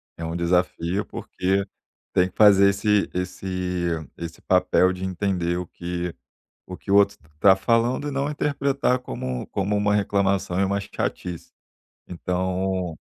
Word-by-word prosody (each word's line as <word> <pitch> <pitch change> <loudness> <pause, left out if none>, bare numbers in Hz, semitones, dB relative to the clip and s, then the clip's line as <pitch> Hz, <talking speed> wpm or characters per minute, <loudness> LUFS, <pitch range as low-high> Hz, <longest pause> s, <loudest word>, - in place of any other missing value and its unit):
É 85 - -8
um 80 +1 -3
desafio, 85 +2 0
porque 95 +2 -2 0.5
tem 90 0 +3
que - - -27
fazer 100 -2 +7
esse 105 +1 +1
esse 90 -1 -3 0.3
esse 85 -1 -7
papel 95 0 +3
de 90 - -7
entender 90 -2 -1
o 90 -1 -4
que 85 0 -4 0.5
o 90 - -8
que - - -6
o - - +5
outro 100 0 +4 0.2
está 95 +5 +6
falando 115 +7 +1
e 145 - -3
não 140 +1 -1
interpretar 140 -3 0
como 65 - -5
como 100 +1 -1
uma 105 0 +2
reclamação 100 -2 +1
e - - +3
uma 100 +1 0
chatice. 90 -3 -5 0.6
Então, 90 0 -2
95 Hz, 145 wpm, -24 LUFS, 90-100 Hz, 0.6 s, fazer